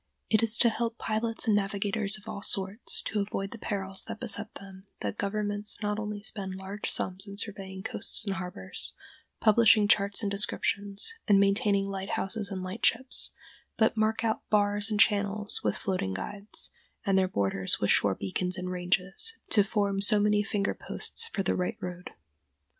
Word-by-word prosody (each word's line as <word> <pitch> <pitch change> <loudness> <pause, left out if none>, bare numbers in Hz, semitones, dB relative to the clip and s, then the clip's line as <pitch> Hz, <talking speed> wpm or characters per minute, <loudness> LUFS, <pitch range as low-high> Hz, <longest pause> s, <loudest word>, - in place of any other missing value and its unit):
It 215 - +4
is 230 0 +2
to 235 - +5
help 230 +1 -3
pilots 225 +1 -2
and 220 -3 +3
navigators 205 +1 0
of 210 +1 -17
all 200 - -6
sorts 195 +3 +1
to 215 - -2
avoid 195 -1 -4
the 235 - -9
perils 195 -2 +2
that - - -7
beset 215 -3 -1
them 190 -1 -11 0.2
that - - -4
governments 205 0 -2
not 210 0 -1
only 210 -1 -5
spend 195 -3 +2
large 190 +2 -5
sums 185 +2 -1
in 200 0 -9
surveying 195 -2 -5
coasts 225 0 -2
and 200 - -1
harbors, 180 - -4 0.5
publishing 215 -1 +5
charts 200 +1 +3
and 200 - -1
descriptions, 200 - +1
and 200 -2 +5
maintaining 200 0 +2
lighthouses 195 +2 -3
and 190 -2 -5
lightships, 230 +7 +2 0.5
but 220 0 +2
mark 220 +1 0
out 220 -1 0
bars 205 0 +3
and 210 -1 -2
channels 205 -1 +2
with - - 0
floating 180 - -2
guides, 200 - -2 0.3
and 195 -2 +2
their 190 -1 +3
borders 95 - 0
with 100 - +1
shore 100 -2 +3
beacons 180 - -2
and 180 0 -4
"ranges," 185 - 0 0.2
to 205 - +6
form 200 -1 -1
so 210 +1 +7
many 210 0 +2
finger 205 -1 -1
posts 460 - -1
for 195 - -3
the 190 - +1
right 180 - -2
road. 180 0 -7
200 Hz, 170 wpm, -28 LUFS, 190-215 Hz, 0.5 s, so